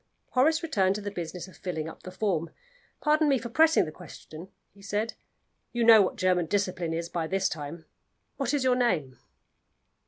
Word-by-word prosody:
Horace 315 +6 +3
returned 195 - +1
to 210 - -4
the 205 0 -4
business 175 0 -6
of 185 - -15
filling 160 -5 -4
up 160 - -10
the - - -8
form. 185 -4 -1 0.5
"Pardon 305 0 +3
me 275 - +4
for 235 0 -6
pressing 320 +5 +4
the 155 - -6
question," 165 0 -11 0.3
he 200 - -18
said. 205 +3 -2 0.6
"You 240 -1 0
know 225 -2 +8
what 190 - 0
German 180 -2 +1
discipline 185 -3 -1
is 165 +1 -2
by 170 -2 -3
this 190 +2 +1
time. 155 +2 -6 0.5
What 270 -3 -1
is 290 -3 0
your 255 -1 +3
name?" 170 - 0
190 Hz, 185 wpm, -28 LUFS, 170-235 Hz, 0.6 s, know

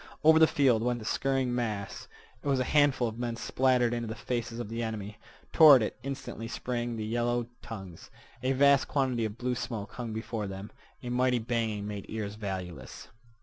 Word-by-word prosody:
Over 160 +1 +7
the 160 - +7
field 135 -9 +3
went 120 +1 0
the 110 - -8
scurrying 135 0 0
mass. 105 -6 -3 0.3
It - - -7
was 135 -2 +2
a - - +2
handful 140 -3 +3
of 115 +1 -6
men 120 -1 -2
splattered 125 0 +2
into 120 -1 -2
the 110 - -4
faces 115 +1 -3
of 120 -2 -4
the 115 +2 -4
enemy. 105 -2 -5 0.3
Toward 145 -7 +9
it - - -3
instantly 130 -3 -5
sprang 120 0 -3
the 110 -1 -4
yellow 120 +1 0 0.2
tongues. 95 -8 -9 0.3
A 130 +2 +1
vast 140 0 +5
quantity 130 -5 0
of 105 +1 -5
blue 125 +1 -1
smoke 110 -5 -4
hung 120 -2 -5
before 110 -1 -4
them. 95 +2 -7 0.3
A 125 - -4
mighty 125 0 +2
banging 110 -3 -2
made 105 -2 -6
ears 105 -2 -4
valueless. 95 -5 -6
120 Hz, 190 wpm, -29 LUFS, 110-125 Hz, 0.3 s, Toward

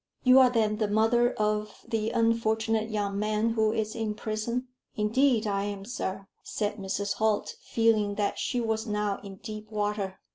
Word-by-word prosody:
"You 255 +1 +7
are 255 -1 +7
then 220 -3 +1
the 215 -1 +1
mother 225 +4 +3
of 210 0 -2
the 225 -2 -1
unfortunate 225 -1 +1
young 200 -2 -1
man 215 +2 +1
who 220 -1 +2
is 215 -1 -2
in 220 -2 -2
prison?" 225 +4 -3 0.3
"Indeed 225 +2 +2
I 200 -1 0
am, 200 -1 -5
sir," 195 -4 -4
said 210 -1 -3
Mrs. 200 0 -2
Holt, 215 -1 +1
feeling 215 -3 +2
that 205 -1 -1
she 245 - -1
was 225 -1 -1
now 210 -1 -1
in 195 -1 -8
deep 215 +2 -8
water. 205 -2 -2
215 Hz, 170 wpm, -28 LUFS, 205-225 Hz, 0.3 s, You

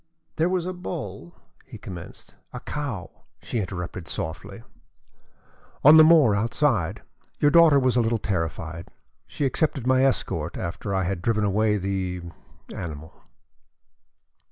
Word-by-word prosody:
"There 165 +3 +2
was 180 -2 -1
a 185 - -3
bull," 115 - -7 0.3
he - - -11
commenced, 90 -3 -10 0.2
"A - - -5
cow," 140 - -5 0.3
she 120 - -3
interrupted 90 -3 -5
softly. 95 +7 -5 1.2
"On 150 +3 +9
the 155 - +9
moor 155 -8 +6
outside. 115 - 0 0.3
Your 145 - +3
daughter 165 -3 +6
was 130 -2 +2
a 120 - +4
little 115 0 +1
terrified. 85 -4 -4 0.4
She 145 - -3
accepted 135 -2 -1
my 130 0 +3
escort 85 - 0
after 95 +3 -4
I 95 - +1
had 90 -1 -3
driven 110 +2 0
away 105 +1 +2
the 95 -2 -3 0.5
animal." 80 -2 -7
105 Hz, 130 wpm, -24 LUFS, 90-140 Hz, 1.2 s, On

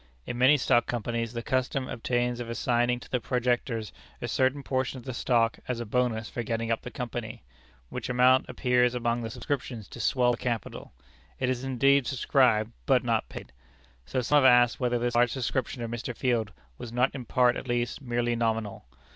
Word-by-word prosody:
In - - -4
many 130 +4 +5
stock 120 -3 +2
companies 115 0 -2
the 115 0 -4
custom 130 +1 -1
obtains 120 +1 -1
of 120 -1 -5
assigning 120 +1 +1
to - - -14
the 125 - +1
projectors 120 -2 -1 0.3
a - - -4
certain 130 +2 +1
portion 130 0 -1
of 125 - -11
the 130 - -4
stock 115 -1 +1
as 125 -2 -2
a 120 - -4
bonus 115 -1 0
for 120 - -4
getting 115 0 -2
up 115 - 0
the - - -7
company, 120 - -6 0.5
which - - -5
amount 125 +1 +4
appears 125 -1 +2
among 120 0 0
the 115 - -4
subscriptions 120 -2 -4
to - - -10
swell 125 -2 +2
the 120 - -2
capital. 120 -3 -4 0.5
It 130 -1 +1
is 125 0 -3
indeed 135 +1 +3
subscribed, 120 -4 +2 0.2
but - - +4
not - - 0
paid. - - -9 0.6
So 130 - -1
some 145 +5 +3
have 130 -3 +7
asked 120 0 +4
whether 125 -2 +1
this 120 0 -1
large 120 0 +3
subscription 130 -1 -2
of 115 - -4
Mr. 120 +1 -5
Field 120 -5 0 0.3
was 115 - -7
not 125 +2 +1
in 130 -3 -6
part 125 +1 +3
at - - -6
least 120 0 -1
merely 120 -2 -1
nominal? 110 - -2
120 Hz, 195 wpm, -28 LUFS, 115-130 Hz, 0.6 s, have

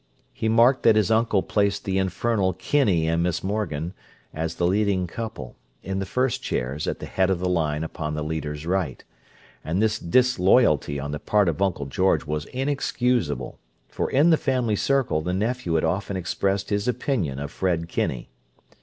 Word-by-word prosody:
He 110 - -1
marked 120 +4 +4
that 115 - +5
his 110 -1 +2
uncle 110 -3 +2
placed 100 -1 0
the 95 0 0
infernal 95 +1 0
Kinney 95 - +1
and 85 +1 +1
Miss 90 -1 -1
Morgan, 90 -5 -2 0.4
as 80 +1 -3
the 90 - 0
leading 95 0 +1
couple, 105 - -7 0.3
in 95 0 -3
the 95 - -3
first 130 +3 0
chairs 65 +5 -3
at - - -1
the - - -7
head 95 0 +1
of 95 - +1
the 90 +1 -2
line 80 -4 0
upon 75 -1 -4
the 75 - -3
leader's 75 -1 -4
right; 85 -6 -1 0.6
and 85 +4 -1
this 110 0 +1
disloyalty 95 - +3
on 70 +1 -4
the 75 - -4
part 105 +2 +2
of 85 +2 -1
Uncle 90 -7 0
George 80 +3 +1
was 75 0 -3
inexcusable, 125 - -1 0.3
for - - -2
in 150 +6 +4
the 160 - +5
family 125 -7 0
circle 135 - +1
the 90 +3 -2
nephew 110 -4 -1
had 80 - +2
often 95 +4 -1
expressed 95 +3 -1
his 100 +2 0
opinion 115 - -1
of 70 +1 -5
Fred 85 -3 -1
Kinney. - - -3
95 Hz, 180 wpm, -24 LUFS, 80-110 Hz, 0.6 s, that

